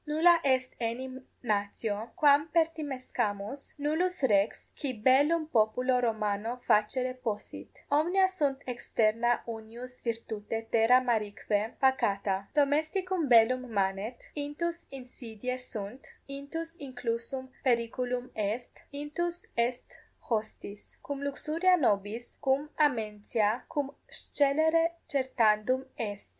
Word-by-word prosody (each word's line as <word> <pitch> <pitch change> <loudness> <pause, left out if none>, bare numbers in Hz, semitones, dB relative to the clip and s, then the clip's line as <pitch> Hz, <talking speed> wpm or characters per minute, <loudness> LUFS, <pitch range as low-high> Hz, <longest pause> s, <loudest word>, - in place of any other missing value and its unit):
Nulla 335 +3 +5
est 260 -2 +2
enim 255 +3 -4 0.2
natio, 210 0 -1
quam 290 0 +5
pertimescamus, 275 -8 -1
nullus 315 +3 0
rex, 205 -4 +2
qui 275 -4 -3
bellum 280 +8 +4
populo 250 0 +2
Romano 220 0 -1
facere 250 +5 +2
possit; 215 -4 -5 0.2
omnia 350 +6 +4
sunt 290 -8 -1
externa 240 -1 +1
unius 235 +3 -8
virtute 225 -1 -4
terra 230 +3 +6
marique 220 -5 -1 0.3
pacata: 200 -7 +1
domesticum 315 +3 +1
bellum 245 +1 +5
manet, 195 +3 -1 0.2
intus 305 +4 -3
insidiae 250 -2 -6
sunt, 235 0 -6 0.2
intus 305 +4 -6
inclusum 255 0 -4
periculum 250 0 0
est, 215 +3 -3
intus 320 +5 -3
est 240 +1 -2 0.3
hostis: 215 -2 -4
cum 280 -1 -5
luxuria 320 +6 +2
nobis, 210 -1 0
cum 280 +2 +1
amentia, 220 -4 +1
cum 285 -2 -2 0.2
scelere 320 +4 +2
certandum 255 -2 +2
est. 205 -3 -5
255 Hz, 100 wpm, -30 LUFS, 225-285 Hz, 0.3 s, terra